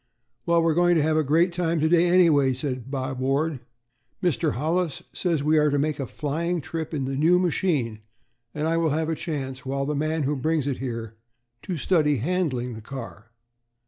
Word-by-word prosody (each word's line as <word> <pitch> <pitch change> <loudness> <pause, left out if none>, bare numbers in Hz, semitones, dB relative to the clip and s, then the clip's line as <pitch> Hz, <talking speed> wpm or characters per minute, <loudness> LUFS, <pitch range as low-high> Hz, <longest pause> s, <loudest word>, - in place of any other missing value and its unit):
"Well, 170 0 +4
we're 165 -1 +3
going 175 +1 +3
to 155 - +3
have 155 0 +1
a 155 - +3
great 165 +5 +2
time 170 -2 0
to 155 - +2
day, 170 +1 +4
anyway," 160 -7 +4
said 130 -2 -4
Bob 130 -1 -3
Ward; 140 +3 0 0.6
"Mr. 160 -11 +1
Hollis 160 +3 -1
says 165 -6 0
we 155 +1 +4
are 150 0 +3
to 145 - +1
make 150 +1 -1
a 135 - -3
flying 165 +4 -2
trip 160 +1 -5
in 145 -4 -2
the 135 +1 -3
new 165 +6 +4
machine, 155 - 0 0.5
and 150 +4 -2
I 165 +1 +1
will 165 -1 +2
have 160 +2 -1
a 160 - 0
chance, 135 -5 -5
while 135 +1 -2
the 150 - -1
man 155 +2 -1
who 145 +2 0
brings 155 +1 0
it 140 - 0
is 130 - -4
here, 115 -3 -5 0.4
to 180 - -4
study 150 -2 +2
handling 130 -4 -1
the 110 - -8
car." 115 -2 -9
150 Hz, 205 wpm, -25 LUFS, 135-165 Hz, 0.6 s, Well